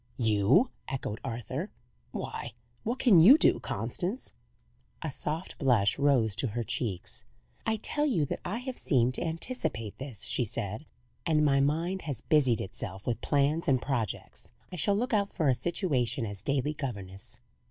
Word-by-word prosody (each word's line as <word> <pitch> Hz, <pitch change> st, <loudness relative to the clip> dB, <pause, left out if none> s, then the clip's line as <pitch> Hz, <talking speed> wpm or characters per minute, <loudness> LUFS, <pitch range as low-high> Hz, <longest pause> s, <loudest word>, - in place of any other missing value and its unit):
"You!" 110 Hz, -, +4 dB, 0.2 s
echoed 130 Hz, -5 st, -4 dB
Arthur. 125 Hz, -, -4 dB, 0.4 s
"Why, -, -, -5 dB, 0.3 s
what 235 Hz, +3 st, -2 dB
can 225 Hz, -10 st, +6 dB
you 225 Hz, -, +9 dB
do, -, -, +4 dB
Constance?" 195 Hz, +8 st, -3 dB, 0.7 s
A 160 Hz, -, -2 dB
soft 155 Hz, +6 st, -4 dB
blush 120 Hz, -8 st, +3 dB
rose 130 Hz, -8 st, +3 dB
to 130 Hz, -, +1 dB
her 120 Hz, +2 st, -2 dB
cheeks. 100 Hz, -5 st, -2 dB, 0.4 s
"I 220 Hz, -, +3 dB
tell 295 Hz, +7 st, 0 dB
you 175 Hz, -, +2 dB
that -, -, -4 dB
I 205 Hz, -, -2 dB
have 250 Hz, +1 st, -5 dB
seemed 130 Hz, -6 st, +2 dB
to -, -, +1 dB
anticipate 165 Hz, -, -3 dB
this," 130 Hz, -7 st, -5 dB
she 125 Hz, -, +1 dB
said, 115 Hz, +3 st, -3 dB, 0.4 s
"and 155 Hz, -2 st, +3 dB
my 140 Hz, -1 st, +4 dB
mind 165 Hz, +7 st, +1 dB
has 130 Hz, -5 st, -3 dB
busied 135 Hz, -8 st, +3 dB
itself 95 Hz, -1 st, -6 dB
with 120 Hz, -, -1 dB
plans 145 Hz, +3 st, +1 dB
and 130 Hz, -2 st, +4 dB
projects. 120 Hz, -6 st, -2 dB, 0.2 s
I -, -, -5 dB
shall 200 Hz, +5 st, +2 dB
look 240 Hz, +4 st, -1 dB
out 200 Hz, -2 st, +2 dB
for 155 Hz, -6 st, +1 dB
a -, -, +5 dB
situation 130 Hz, -, 0 dB
as 100 Hz, -2 st, -6 dB
daily 140 Hz, +4 st, 0 dB
governess." 100 Hz, -10 st, -5 dB
140 Hz, 165 wpm, -30 LUFS, 115-175 Hz, 0.7 s, you